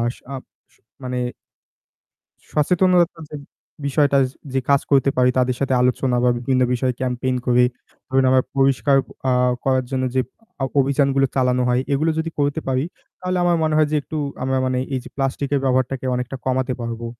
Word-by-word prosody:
স - - -19 0.2
up 130 - -6 0.6
মানে 125 0 -3 1.3
সচেতনতার 175 +1 +2
যে 150 - -6 0.5
বিষয়টা 140 0 +3
যে 130 0 -2 0.2
যে 135 - +1
কাজ 140 -1 +5
করতে 140 0 +4
পারি 125 0 +4
তাদের 125 -1 +1
সাথে 135 -1 +1
আলোচনা 125 0 +1
বা 125 - +4
বিভিন্ন 130 +1 +1
বিষয়ে 125 +1 0
ক্যাম্পেইন 130 0 -1
করি। 125 0 +4 0.4
ধরুন 135 0 +2
আমরা 130 0 +4
পরিষ্কার 135 +1 +3 0.3
আ - - +3 0.3
করার 130 -1 +2
জন্য 130 -1 -1
যে 130 - +3 0.4
অ - - +2 0.2
অভিযানগুলো 135 0 +2
চালানো 125 -1 +2
হয়, 125 +1 +2
এগুলো 155 +4 +2
যদি 165 +1 -2
করতে 145 +2 0
পারি, 130 +2 +1 0.4
তাহলে 185 0 -1
আমার 175 -1 +3
মনে 155 -1 +1
হয় 155 -1 +3
যে 155 - +1
একটু 155 - -7 0.3
আমরা 130 0 0
মানে 130 0 0 0.2
এই 130 - -1
যে - - -9
প্লাস্টিক 135 0 -2
এর 140 - +2
ব্যবহারটাকে 130 0 0
অনেকটা 125 +2 -3
কমাতে 130 0 0
পারবো। 115 0 -4
130 Hz, 175 wpm, -21 LUFS, 125-140 Hz, 1.3 s, কাজ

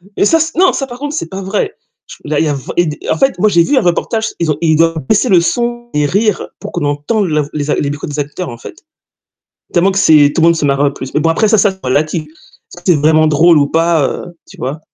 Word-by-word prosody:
Et - - +1
ça 325 +10 +3
c 320 +1 0
non, 370 +2 +4
ça 270 - -3
par 245 - -9
contre 290 +3 -5
c'est 165 - -4
pas 190 +1 -6
vrai, 205 - -2 0.3
ch - - -13
là, 150 0 -1
il 160 - +1
y - - -1
a 145 - 0
v 135 - -6
et 175 - +3
des 150 -1 -6
en - - +1
fait 270 -5 +1
moi 210 +3 +2
j'ai 170 -3 +3
vu 285 - 0
un - - +4
reportage, 220 +5 -1
ils 165 -2 -1
ont 150 - 0
ils 160 -2 +2
doivent 165 0 +2
baisser 220 +4 +2
le 185 -6 +4
son 240 +5 -2
et 150 0 +1
rire, 200 +6 0
pour - - -7
qu'on 145 - -3
entende 150 +9 -1
la 150 -2 0
v 145 - -6
les 150 -1 -4
a - - +2
les 140 - -1
micro 145 +4 -5
des 150 0 -6
acteurs, 150 +5 -4
en 120 - -9
fait. 115 - -11 1.0
Tellement 185 +2 +2
que 195 - -1
c'est 150 -5 +5
tout - - 0
le 165 - +5
monde 170 - +3
se 155 - -2
marre 140 0 +1
le 140 -1 +2
plus. 130 -1 -8
Mais 150 - +2
bon 165 - +1
après 190 +7 +2
ça, 220 - +4
ça, 200 0 +3
c'est 190 - -13
relatif, 155 +5 0
est-ce 155 +2 -21
que 175 - -16
c'est 175 -4 +4
vraiment 155 +1 +3
drôle 160 +2 +4
ou 145 - +2
pas 165 -2 +1
heu, - - -5 0.2
tu - - -14
vois? 135 +5 -4
165 Hz, 295 wpm, -14 LUFS, 150-200 Hz, 1.0 s, c'est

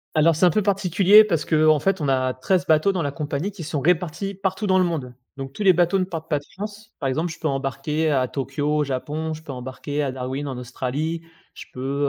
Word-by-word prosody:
Alors 160 +1 +4
c'est 165 - +3
un - - +6
peu 205 +6 +1
particulier 195 +1 +5
parce 170 -8 -1
qu'en 155 -1 +4
fait 195 +3 0
on 145 - 0
a 130 -1 +1
13 180 +9 0
bateaux 160 +4 +4
dans 185 -3 -2
la 140 - -1
compagnie 150 +5 -3
qui 190 -4 -8
sont 150 -2 -3
répartis 180 +4 0
partout 190 +2 -2
dans 185 -1 +4
le - - +4
monde 145 -8 -3 0.2
donc 135 -1 -7
tous - - -8
les 195 -2 +6
bateaux 175 +3 +2
ne - - +2
partent 165 -3 -6
pas 150 - +1
de - - -18
France. 210 +2 -7
Par 140 - -1
exemple 160 +6 -1
je 160 - -10
peux 160 - -1
embarquer 140 +3 -1
à 130 -2 +2
Tokyo 145 +3 -2
au 150 - +2
Japon, 150 +4 -3
je 155 +1 -9
peux 145 - -7
embarquer 130 +3 -4
à 135 -2 -1
Darwin 130 +2 -4
en 130 -2 -5
Australie, 135 +6 -3 0.3
je - - -10
peux, 140 +2 -1
155 Hz, 245 wpm, -23 LUFS, 135-180 Hz, 0.3 s, un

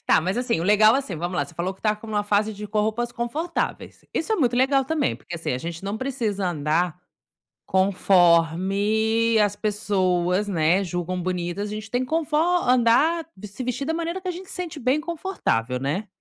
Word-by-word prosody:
Tá, - - +5
mas 185 +6 -2
assim, 245 -8 0
o - - -2
legal, 215 +3 +6
assim. 270 -10 -2
Vamos 175 +3 -3
lá, - - +1
você 175 - -15
falou 185 +3 -2
que - - -27
tá 215 -1 +2
com 225 - -12
uma 210 -1 -1
fase 210 +1 +1
de 210 +1 -7
pôr 210 +1 0
roupas 235 +3 -1
confortáveis. 300 +9 -3
Isso 385 +7 -1
é - - +2
muito 245 -5 +1
legal 270 +1 +3
também, 300 -1 0
porque, 175 - -9
assim, 165 -6 -3
a 125 - -2
gente 170 +5 -6
não 200 +2 -2
precisa 225 -8 -2
andar 160 +2 0 0.7
conforme 195 +5 +3
as 205 -1 +2
pessoas, 195 -3 0
né, 175 +1 +2
julgam 180 0 -3
bonitas. 180 +3 -3
A - - -7
gente 215 +1 -6
tem 245 +1 0
que 255 - -3
confo 320 -1 -1
andar 315 -1 +3 0.2
se 210 +6 -7
vestir 250 +3 -3
da 320 - -1
maneira 335 +3 -3
que 370 - -7
a - - 0
gente 365 +2 -9
sente 345 -5 -5
bem 260 +5 +1
confortável, 310 - -2
né, 160 +11 -2
210 Hz, 200 wpm, -24 LUFS, 180-260 Hz, 0.7 s, legal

